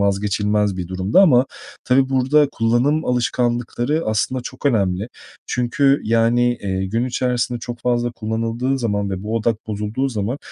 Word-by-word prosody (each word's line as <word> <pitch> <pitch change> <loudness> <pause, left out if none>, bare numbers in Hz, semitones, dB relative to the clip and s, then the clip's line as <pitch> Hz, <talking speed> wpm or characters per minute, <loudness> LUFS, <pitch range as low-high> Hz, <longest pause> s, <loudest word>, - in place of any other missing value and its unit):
vazgeçilmez 105 0 +1
bir 90 -2 -5
durumda 95 - +2
ama 130 -7 +5 0.4
tabii 130 +1 +3
burada 135 +2 +3
kullanım 125 +7 +1
alışkanlıkları 120 +3 0
aslında 110 +4 0
çok 130 +3 -5
önemli 100 -4 +1 0.4
çünkü, 135 +3 +1
yani, 115 +2 +2
eee, 95 -1 -2
gün 115 +5 -1
içerisinde 125 -1 -1
çok 120 0 -7
fazla 120 -1 0
kullanıldığı 115 +4 -2
zaman 100 -4 -1
ve 95 0 -4
bu 110 +2 -3
odak 115 0 -1
bozulduğu 105 +5 -2
zaman 115 +2 -3
120 Hz, 145 wpm, -20 LUFS, 105-125 Hz, 0.4 s, ama